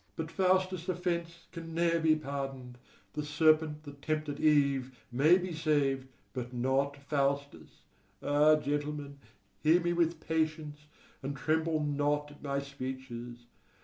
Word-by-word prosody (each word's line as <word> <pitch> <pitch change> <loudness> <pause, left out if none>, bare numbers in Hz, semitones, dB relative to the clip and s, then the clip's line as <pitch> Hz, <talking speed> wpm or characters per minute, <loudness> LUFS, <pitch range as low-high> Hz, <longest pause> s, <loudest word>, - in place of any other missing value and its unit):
But 160 0 -4
Faustus' 185 -1 +1
offence 170 -1 -2
can 165 -2 -7
ne'er 170 0 +2
be 160 -1 +4
pardoned: 135 -4 -5 0.3
the 150 - -2
serpent 155 0 +3
that 145 -2 -11
tempted 155 -1 -2
Eve 140 -4 +2
may 150 +8 +5
be 185 -1 -4
saved, 145 -4 +1 0.3
but 125 -1 -4
not 135 +3 0
Faustus. 140 0 -2 0.4
Ah, 150 +2 +5
gentlemen, 145 -1 -3 0.4
hear 160 +3 +5
me 175 0 0
with 170 -1 +1
patience, 155 -2 -2 0.3
and 140 +1 -4
tremble 160 +2 +1
not 145 0 0
at 145 - -16
my 140 -1 -2
speeches! 130 -3 -6
150 Hz, 130 wpm, -31 LUFS, 140-160 Hz, 0.4 s, may